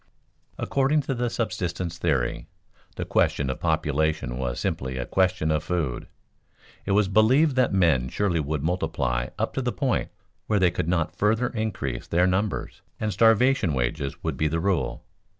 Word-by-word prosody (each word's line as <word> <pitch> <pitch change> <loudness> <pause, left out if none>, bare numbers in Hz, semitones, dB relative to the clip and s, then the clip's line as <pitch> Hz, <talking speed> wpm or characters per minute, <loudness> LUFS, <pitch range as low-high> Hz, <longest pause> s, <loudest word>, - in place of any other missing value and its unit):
According 140 +3 +1
to 135 - -3
the 120 -1 -1
subsistence 90 -7 -3
theory, 70 -8 0 0.5
the - - -4
question 65 -2 +1
of - - -6
population 75 -4 0
was 60 -2 -2
simply 65 -1 -2
a 60 - -2
question 90 -1 +1
of 75 0 0
food; 80 -8 -2 0.8
it 100 - +2
was 105 0 +3
believed 125 +9 +4
that 125 -2 +3
men 80 -10 +2
surely 90 -1 0
would 75 -1 -2
multiply 65 -8 -1
up - - -1
to - - -1
the - - -1
point - - -1 0.4
where 105 - +2
they 95 -3 +4
could 85 -1 -2
not 85 -2 0
further 110 +4 +1
increase 105 - -3
their 90 +2 +3
numbers, 95 +3 -1 0.2
and 105 -1 -1
starvation 115 - +4
wages 70 +3 -2
would - - -2
be 75 - +1
the 80 +2 -1
rule. 95 0 -1
90 Hz, 165 wpm, -25 LUFS, 75-110 Hz, 0.8 s, believed